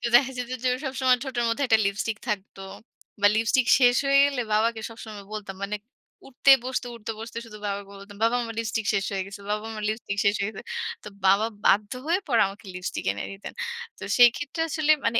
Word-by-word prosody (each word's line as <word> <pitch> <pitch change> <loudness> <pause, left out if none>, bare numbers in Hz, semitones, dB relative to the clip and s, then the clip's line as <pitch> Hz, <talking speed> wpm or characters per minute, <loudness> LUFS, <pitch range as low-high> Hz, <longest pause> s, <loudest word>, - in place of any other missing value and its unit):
দেখা 265 +1 +5
যেত 250 -1 -4
যে 255 - +3 0.2
সবসময় 260 -1 +2
ঠোটের 250 -3 -2
মধ্যে 230 +5 0
একটা 220 -1 +5
লিপস্টিক 200 +2 -1
থাকতো। 195 -2 -4 0.6
বা 205 - +7
লিপস্টিক 230 +3 +3
শেষ 245 -1 +6
হয়ে 275 0 +5
গেলে 280 -3 0
বাবাকে 220 +1 +2
সবসময় 220 -3 -9
বলতাম। 200 -3 -6
মানে 200 +1 -2 0.5
উঠতে 270 +1 +4
বসতে, 255 0 -2
উঠতে 225 0 -5
বসতে 230 +1 -7
শুধু 210 -2 -11
বাবাকে 200 0 -3
বলতাম, 200 0 -12
"বাবা 230 +2 +3
আমার 230 -1 -5
লিপস্টিক 225 -1 -2
শেষ 195 0 +1
হয়ে 190 -1 -1
গেছে, 200 +1 -9
বাবা 210 +1 -2
আমার 215 -1 -6
লিপস্টিক 215 -2 -4
শেষ 200 +1 +4
হয়ে 200 +2 -1
গেছে।" - - -9 0.4
তো - - -8 0.2
বাবা 200 +3 +5 0.2
বাধ্য 205 +1 +4 0.2
হয়ে 350 +3 +3
পরে 235 -4 +3
আমাকে 200 +2 -11
লিপস্টিক 180 0 -4
এনে 100 - -5
দিতেন। 195 +1 -9 0.4
তো - - -9
সেই 245 -1 +9
ক্ষেত্রে 290 +3 -4
আসলে 310 0 +2 0.2
মানে 230 - +2
220 Hz, 200 wpm, -26 LUFS, 205-245 Hz, 0.6 s, সেই